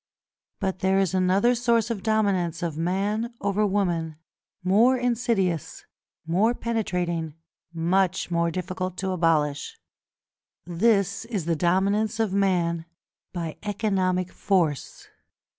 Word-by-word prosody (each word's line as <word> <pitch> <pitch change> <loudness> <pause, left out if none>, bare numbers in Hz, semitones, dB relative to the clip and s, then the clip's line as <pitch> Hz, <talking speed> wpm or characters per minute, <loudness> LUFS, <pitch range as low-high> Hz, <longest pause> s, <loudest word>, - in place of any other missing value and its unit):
But 190 -1 -2
there 190 +1 +2
is 195 -3 +1
another 190 +6 +3
source 235 -1 +1
of 210 -4 -3
dominance 190 -6 0
of 165 -3 -2
man 200 +8 -1
over 200 +1 +1
woman, 175 -5 -1 0.5
more 225 +8 +4
insidious, 230 - -1 0.4
more 200 +9 +2
penetrating, 180 -9 -2 0.4
much 180 +2 0
more 170 0 +1
difficult 185 +1 -4
to 190 0 -2
abolish: 155 -5 0 0.9
this 200 +3 +1
is 210 -8 -3
the 170 0 +1
dominance 200 +6 +1
of 220 -4 0
man 175 -4 +1 0.5
by 165 -3 -5
economic 190 -3 0
force. 170 -8 -1
190 Hz, 110 wpm, -25 LUFS, 170-210 Hz, 0.9 s, more